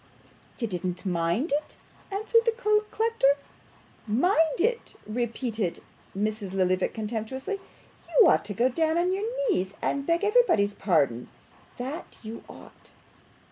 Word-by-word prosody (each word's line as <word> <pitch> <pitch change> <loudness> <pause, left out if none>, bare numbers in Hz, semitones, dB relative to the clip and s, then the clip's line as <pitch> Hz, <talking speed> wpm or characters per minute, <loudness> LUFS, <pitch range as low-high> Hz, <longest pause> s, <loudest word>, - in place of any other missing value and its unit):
'You 235 - -1
didn't 180 -1 -4
mind 175 - 0
it?' 295 +2 -1 0.3
cried 400 +2 -3 0.2
the 460 -1 +1 0.3
collector. 445 -12 +2 0.7
'Mind 320 - +2
it!' 465 +5 0
repeated 225 -3 -2 0.4
Mrs. 210 -2 -2
Lillyvick 185 -1 +1
contemptuously. 235 - -3 0.5
'You 470 - +6
ought - - +4
to 205 -1 -5
go 240 +5 +3
down 320 +5 +1
on 360 +2 +2
your 400 +3 -1 0.2
knees 190 +2 -1
and 280 - -1
beg 335 +3 +2
everybody's 410 - +4
pardon, 140 - +1 0.5
that 265 +6 -6
you 225 +1 -7
ought. - - -14
240 Hz, 125 wpm, -27 LUFS, 200-335 Hz, 0.7 s, You